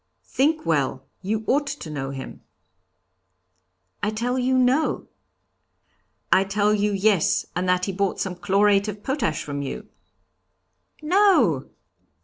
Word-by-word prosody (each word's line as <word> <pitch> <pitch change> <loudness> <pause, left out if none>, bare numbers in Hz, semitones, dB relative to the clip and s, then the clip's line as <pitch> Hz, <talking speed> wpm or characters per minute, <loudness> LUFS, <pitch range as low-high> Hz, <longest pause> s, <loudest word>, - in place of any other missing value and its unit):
'Think 310 +4 0
well; 135 -4 0 0.2
you 210 +3 -2
ought 285 +4 +1
to 275 - -6
know 135 -2 -4
him.' 135 -1 -8 1.6
'I 205 - 0
tell 240 +4 -2
you, 260 +1 +1
no.' 255 +5 +1 1.3
'I 190 - +5
tell 205 +2 +1
you, 210 0 +1
yes, 200 -3 +2
and 180 +1 -1
that 180 0 +2
he 195 - -2
bought 195 0 -1
some 190 - -2
chlorate 200 +3 +2
of 210 0 -6
potash 265 - -1
from 145 -1 -4
you.' 140 - -6 1.2
'No!' 310 - +3
205 Hz, 130 wpm, -23 LUFS, 180-255 Hz, 1.6 s, I